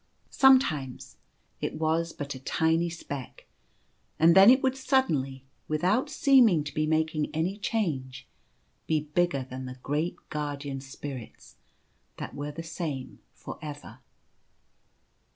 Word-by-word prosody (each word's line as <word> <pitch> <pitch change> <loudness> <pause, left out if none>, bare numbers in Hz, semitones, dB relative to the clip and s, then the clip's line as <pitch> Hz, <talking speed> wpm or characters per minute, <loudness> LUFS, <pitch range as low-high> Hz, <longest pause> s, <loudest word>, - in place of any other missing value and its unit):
Sometimes 165 - +3 0.4
it - - -3
was 160 +1 0
but 145 0 -5
a 130 - -9
tiny 160 +5 +1
speck, 145 -5 -8 0.7
and 165 +1 +6
then 195 +3 +9
it 260 +2 +5
would 265 0 +2
suddenly, 150 - 0 0.2
without 185 - +1
seeming 255 - +5
to 145 - -7
be 155 0 0
making 155 -1 0
any 170 +5 0
change, 145 - -2 0.6
be 155 -1 +2
bigger 150 -2 0
than 130 0 -7
the 130 0 -8
great 150 +5 -1
Guardian 145 -2 -4
Spirits 130 -2 -9 0.6
that - - -6
were 145 +1 -5
the 165 +3 -7
same 160 -5 -5 0.2
for - - -9
ever. 150 -1 -8
155 Hz, 125 wpm, -28 LUFS, 140-175 Hz, 0.7 s, then